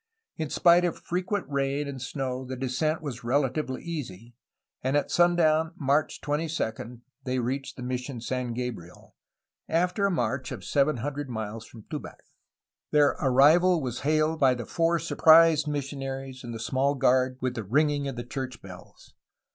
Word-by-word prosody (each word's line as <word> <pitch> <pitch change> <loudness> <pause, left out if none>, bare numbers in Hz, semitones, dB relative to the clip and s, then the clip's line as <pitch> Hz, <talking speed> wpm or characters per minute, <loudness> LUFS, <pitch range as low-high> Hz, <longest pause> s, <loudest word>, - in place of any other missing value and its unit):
In 155 -2 -4
spite 175 +2 +5
of 175 -2 -1
frequent 185 +3 -2
rain 140 +1 -1
and 135 -2 -6
snow 130 -1 -3
the 130 0 -6
descent 135 +5 -1
was 130 -6 -6
relatively 130 +2 -1
easy, 120 - -6 0.5
and 130 +3 +1
at 145 - -1
sundown, 165 -2 +3
March 145 0 0
22, 145 -6 -3 0.2
they 130 0 -2
reached 130 +3 -3
Mission 125 0 -4
San 125 0 -3
Gabriel, 115 -9 -7 0.5
after 180 +5 +1
a - - 0
march 130 - -1
of - - -7
seven 145 0 +2
hundred 145 +3 -4
miles 110 -1 -5
from 110 -3 -13
Tubac. - - -8 0.7
Their 150 -1 +5
arrival 155 +7 +5
was 125 -5 -4
hailed 155 +2 +1
by 130 -2 +4
the 120 -2 -6
four 170 +4 +1
surprised 160 -1 +5
missionaries 135 -2 -4
and 120 - -6
the 115 - -6
small 130 +5 0
guard 130 -1 +2
with 130 -1 -1
the 115 -3 -4
ringing 145 +6 +1
of 135 - -4
the 120 - -5
church 130 -1 -5
bells. 90 -2 -14
135 Hz, 155 wpm, -27 LUFS, 125-155 Hz, 0.7 s, spite